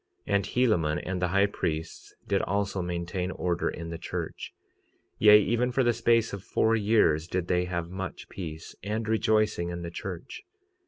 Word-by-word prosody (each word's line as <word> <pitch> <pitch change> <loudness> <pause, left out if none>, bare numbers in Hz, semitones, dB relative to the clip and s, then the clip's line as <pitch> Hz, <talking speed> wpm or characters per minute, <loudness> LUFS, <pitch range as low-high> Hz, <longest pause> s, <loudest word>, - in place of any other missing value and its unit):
46:38 - - -2
And 100 - +2
Helaman 100 -12 +1
and 90 -1 -3
the 90 - +2
high 100 +3 +3
priests 80 -5 -4
did - - +2
also 100 -1 -1
maintain 90 +1 -3
order 90 -2 -1
in 85 0 -6
the 85 - -5
church; - - -5 0.7
yea, 105 0 +8
even 120 +4 +1
for 130 +2 +2
the 120 -1 +3
space 115 -1 +2
of 100 - -5
four 110 +1 +2
years 100 -8 +3
did 90 -1 -2
they 90 0 +1
have 85 -1 -3
much 95 -1 -6
peace 80 -4 -7
and 110 +2 -3
rejoicing 110 -5 +2
in 85 0 -5
the 85 - -5
church. 90 -2 -7
95 Hz, 175 wpm, -28 LUFS, 85-110 Hz, 0.7 s, yea